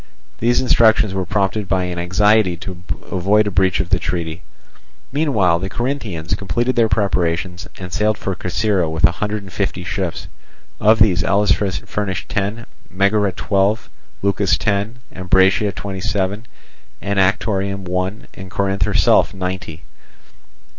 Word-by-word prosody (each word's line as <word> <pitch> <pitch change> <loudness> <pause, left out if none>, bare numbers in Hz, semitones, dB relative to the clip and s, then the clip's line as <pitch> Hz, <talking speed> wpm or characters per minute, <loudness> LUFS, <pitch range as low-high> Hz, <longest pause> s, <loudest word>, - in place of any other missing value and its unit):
These 120 +2 +2
instructions 110 -5 +4
were 95 -2 -2
prompted 100 +1 0
by 95 0 +1
an 90 -1 -3
anxiety 95 +1 +3
to 90 +1 -8 0.3
avoid 100 +4 +2
a 105 - -2
breach 95 0 +2
of 90 - -2
the 95 - +3
treaty. 85 -1 -3 0.7
Meanwhile 110 - +2
the 95 +2 -4
Corinthians 110 - -3
completed 105 +7 -1
their 115 -2 +3
preparations, 90 -3 -1
and 90 -1 -8
sailed 105 0 +1
for 95 - -3
Corcyra 95 -1 0
with 80 0 -4
a 85 - +7
hundred 105 0 -2
and 95 -2 -12
fifty 95 -3 -2
ships. 90 -1 -3 0.5
Of 110 +2 +5
these 95 -6 +3
Elis 100 +1 +2
furnished 95 -1 -2
ten, 105 +3 -2 0.2
Megara 100 +1 +2
twelve, 100 +3 0 0.3
Leucas 100 -4 +2
ten, 100 +2 -1 0.2
Ambracia 95 +3 +3
twenty 95 -1 -6
seven, 100 +2 -2 0.6
Anactorium 100 0 0
one, 90 +3 -3
and 95 0 -10
Corinth 100 0 -1
herself - - +3
ninety. 90 -3 -5
95 Hz, 140 wpm, -19 LUFS, 90-105 Hz, 0.7 s, a